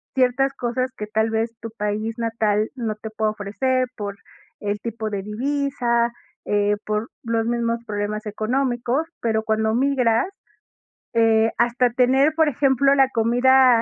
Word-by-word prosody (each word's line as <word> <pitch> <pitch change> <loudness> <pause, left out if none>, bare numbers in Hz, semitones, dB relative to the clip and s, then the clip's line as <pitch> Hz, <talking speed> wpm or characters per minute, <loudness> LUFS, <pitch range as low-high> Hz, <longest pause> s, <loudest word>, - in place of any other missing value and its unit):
ciertas 265 +1 +2
cosas 255 +2 -2
que 210 - -5
tal 220 +1 +1
vez 225 +1 -1
tu 230 - -5
país 210 +2 -2
natal 220 -2 0
no 225 -4 -3
te 220 +1 -8
pueda 220 0 0
ofrecer 255 +5 -1
por 205 -1 -4 0.4
el 205 0 -2
tipo 225 -2 -4
de 200 -2 -3
divisa, 240 0 0 0.3
eh, 205 0 +2
por 215 +2 -2
los 230 -1 0
mismos 235 -1 0
problemas 210 +1 -3
económicos, 245 +6 -1
pero 220 -1 +1
cuando 220 0 +1
migras, 250 -1 +2 0.9
eh, 225 -1 +4
hasta 240 +1 +2
tener, 260 +5 +3
por 320 -1 +4
ejemplo, 275 +1 +3
la 270 -1 +4
comida 245 +1 +5
230 Hz, 145 wpm, -22 LUFS, 215-255 Hz, 0.9 s, comida